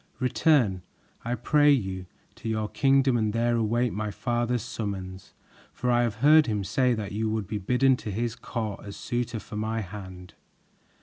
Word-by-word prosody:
Return, 125 - +2 0.4
I 120 +1 -1
pray 145 +5 +3
you, 95 -9 0 0.3
to 115 - -6
your 110 -1 -1
kingdom 135 -2 +3
and 110 -2 0
there 120 +1 +1
await 115 +1 +1
my 105 0 -2
father's 120 +1 -1
summons, 95 -3 -6 0.4
for 125 0 -1
I 120 0 +4
have 115 -3 0
heard 155 +1 +7
him 105 -3 -1
say 125 +6 +1
that 105 -2 -5
you 110 +2 -1
would 110 -1 -2
be 105 +3 -4
bidden 125 +6 +3
to 110 - -7
his 115 +3 -2
court 110 -4 -5
as 100 -1 -8
suitor 120 -2 -3
for 105 0 -8
my 110 +1 -1
hand." 95 -2 -9
115 Hz, 175 wpm, -27 LUFS, 105-125 Hz, 0.4 s, heard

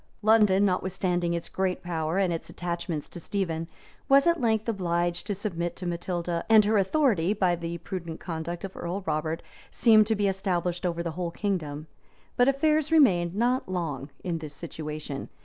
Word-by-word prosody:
] - - -37
London, 210 -3 +5
notwithstanding 180 -2 0
its 170 - -4
great 190 -1 -2
power, 165 -1 -2
and 190 -3 +2
its 165 - -5
attachment 170 -3 -3
to 175 - -9
Stephen, 165 -3 -2 0.4
was 275 0 +6
at 340 -3 +3
length 220 -2 +1
obliged 175 -3 -1
to 205 - -1
submit 175 -4 -3
to 185 - -7
Matilda; 175 0 -2
and 220 -2 +7
her 215 0 +3
authority, 200 - +2
by 185 -4 +2
the 170 0 -5
prudent 170 -1 -6
conduct 170 +1 -5
of 195 -1 -6
Earl 180 +3 -4
Robert, 155 +1 -2 0.3
seemed 215 -3 +5
to 220 - +2
be 205 -1 +1
established 180 -2 -1
over 170 -1 -2
the 170 - -3
whole 175 +1 -3
kingdom; 165 -6 -3 0.5
but 245 - +4
affairs 305 +2 +2
remained 185 - +4
not 245 +1 +1
long 155 -6 -3
in 170 -3 -2
this 150 -2 -7
situation. 155 -3 -6
180 Hz, 175 wpm, -27 LUFS, 170-205 Hz, 0.5 s, and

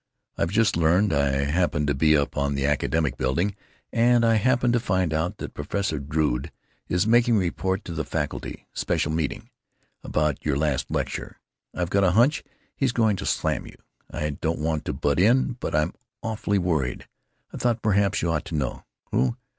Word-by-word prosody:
I've 85 - 0
just 110 +3 +2
learned—I 85 -1 +3 0.2
happened 75 -1 +1
to 70 - +1
be 75 +3 +4
up 70 - -1
in 70 0 0
the 70 0 0
Academic 75 +1 0
Building 85 +10 0 0.4
and 120 0 +4
I 115 - +4
happened 120 +2 +2
to 120 - +3
find 95 -6 0
out 85 +6 -1
that - - -7
Professor 100 -7 -2
Drood 75 -1 -1 0.4
is 90 +3 +1
making 120 +1 +4
a - - +4
report 95 +2 -1
to 85 - -5
the 80 -1 -2
faculty—special 75 - -3
meeting!—about 75 -1 -4
your 75 -3 0
last 70 -4 0
lecture. - - -3 0.4
I've 90 0 -2
got 100 0 +3
a 90 -2 +3
hunch 130 +6 +4 0.3
he's 130 -4 0
going 110 -4 +3
to - - -4
slam - - -1
you. - - -12 0.3
I 75 0 -2
don't 80 +3 -2
want 80 0 -2
to - - -2
butt 70 +2 0
in, 120 +5 +3
but - - -3
I'm 75 0 +1 0.3
awfully 110 -2 -1
worried; 80 -9 -1 0.5
I - - -5
thought 120 -2 0
perhaps 100 -2 +2
you 85 - +1
ought 75 -2 -1
to 80 - -5
know.... 70 -5 -2 0.3
Who? 60 -1 +1
85 Hz, 180 wpm, -25 LUFS, 75-105 Hz, 0.5 s, be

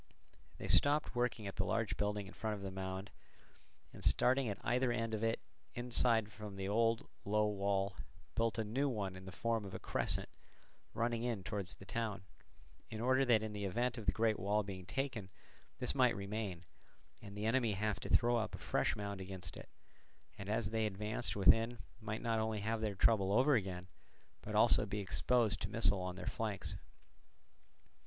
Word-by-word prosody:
They - - -5
stopped 145 +2 +3
working 120 -3 0
at 100 - -5
the 95 - +2
large 110 +2 0
building 105 0 -1
in 95 - -11
front 110 -1 -2
of 100 - -8
the 95 - -4
mound, 95 +1 -5 0.8
and - - -10
starting 130 -1 +3
at 100 - -3
either 125 +1 +2
end 115 -1 -1
of 110 0 -1
it 115 0 +1 0.4
inside 120 -3 +2
from 105 -2 -8
the 95 0 -3
old 115 +2 +2 0.2
low 105 +1 +2
wall, 100 -2 0 0.4
built 115 -2 +1
a 110 - +1
new 130 +7 0
one 100 -6 -2
in 95 0 -10
the 95 - -7
form 115 +3 -1
of 95 -2 -7
a - - -4
crescent - - 0 0.7
running 115 +1 0
in 115 -5 -2
towards 100 -1 -3
the 100 - -13
town; 105 0 -3 0.7
in 110 - -5
order 130 +3 +3
that 115 -4 +4
in 110 -1 -4
the 105 -1 -3
event 120 +5 0
of 105 - -9
the - - +6
great 110 -1 +1
wall 105 +3 +1
being 95 -3 -7
taken 110 -1 -3 0.5
this - - -1
might - - +4
remain, 100 -3 -4 0.6
and 100 0 -9
the 105 - -2
enemy 115 -1 +2
have 105 +1 -1
to - - -6
throw 120 0 +4
up 110 -1 -2
a - - -6
fresh - - 0
mound 100 -2 -4
against 95 -1 -7
it, - - -10 0.7
and 100 0 -7
as 110 0 0
they 110 -1 +1
advanced 105 +3 -2
within 115 +5 +5 0.2
might 110 0 -4
not 115 -1 +1
only 110 -1 -1
have 110 +1 -1
their 105 -2 -1
trouble 100 -1 +4
over 130 +7 +5
again, 95 -6 0 0.6
but - - -5
also - - +6
be 105 - -2
exposed 110 +3 +1
to 100 - -2
missiles 100 -3 +4
on 90 - -6
their 90 -1 -7
flanks. 105 -4 -2
105 Hz, 190 wpm, -36 LUFS, 100-115 Hz, 0.8 s, the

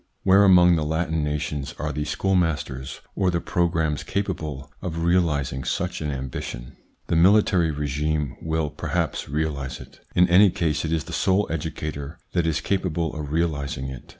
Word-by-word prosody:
Where 100 +1 +6
among 90 -3 +6
the 80 - 0
Latin 80 0 -1
nations 75 -1 -3
are 75 0 -2
the 75 +1 -3
schoolmasters 75 -8 -1
or 95 -2 +1
the 85 -1 0
pro 85 +1 +1
grammes 80 -3 -1
capable 80 -8 -3
of 85 -2 -3
realising 75 -7 +1
such 90 +8 -2
an 75 - -2
ambition? 65 -1 -5 0.3
The - - -1
military 90 -1 +4
regime 75 -1 -1
will 80 -2 -1
perhaps 75 - -2
realise 70 -3 -2
it. - - -13 0.2
In 90 0 +5
any 95 +3 +7
case 80 -4 -1
it 80 - -2
is 80 -2 0
the - - -9
sole 95 +2 +2
educator 75 0 -4
that 85 -2 +1
is 80 0 0
capable 85 -5 -1
of 75 -2 -5
realising 70 -5 -1
it. 65 -2 -9
80 Hz, 165 wpm, -24 LUFS, 75-85 Hz, 0.3 s, any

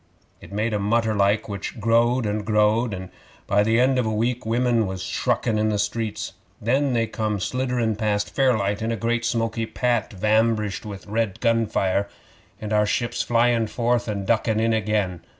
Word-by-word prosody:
It - - -13
made 105 +2 -1
a 105 - 0
mutter 110 +2 +1
like, 100 +1 +2
which 100 +2 -6
growed 115 +2 +2
and 105 0 -1
growed, 105 +2 +2
and 95 -1 -6 0.3
by 100 +1 +2
the 110 +2 +2
end 130 +1 +3
of 125 - 0
a - - 0
week 115 +2 -1
women 120 -1 +2
was 95 -1 -5
shruckin' 110 -2 0
in 110 0 +2
the 105 - 0
streets. 110 +1 -2 0.3
Then 135 +4 +1
they 115 -1 +2
come 110 -1 -2
slidderin' 125 +1 -1
past 105 -1 -1
Fairlight 110 -6 +1
in 110 +1 -1
a - - 0
great 120 +1 -1
smoky 115 -1 -1
pat 120 -2 0
vambrished 110 0 +1
with 100 -2 -8
red 110 -1 -2
gun 115 -2 +2
fire, 100 -1 0 0.5
and 110 0 -4
our 105 0 +3
ships 120 +2 -1
flyin' 120 -1 +2
forth 120 +2 0
and 100 -2 -3
duckin' 110 0 +1
in 115 0 +2
again. 105 -5 -1
110 Hz, 185 wpm, -23 LUFS, 105-115 Hz, 0.5 s, end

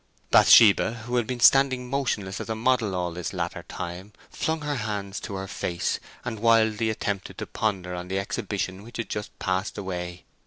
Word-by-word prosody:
Bathsheba, 110 +1 +6
who 125 +1 -1
had 120 -3 0
been 125 -1 -3
standing 130 0 +5
motionless 115 -8 -2
as - - -7
a 110 - -1
model 115 -3 +1
all 90 -1 -1
this 90 0 -5
latter - - -3
time, 90 +4 -7 0.2
flung 160 0 -2
her 145 -1 -2
hands 105 -3 -3
to 100 - -6
her 95 0 -4
face, 85 -2 -2 0.3
and 115 -3 -4
wildly 110 -1 +3
attempted 100 -3 -3
to - - -4
ponder 95 -5 -2
on 90 0 -5
the 95 +1 -2
exhibition 95 -1 -3
which 115 +3 -10
had 115 - -4
just 105 -1 -5
passed 95 +1 -2
away. 90 -3 -5
105 Hz, 185 wpm, -26 LUFS, 95-115 Hz, 0.3 s, Bathsheba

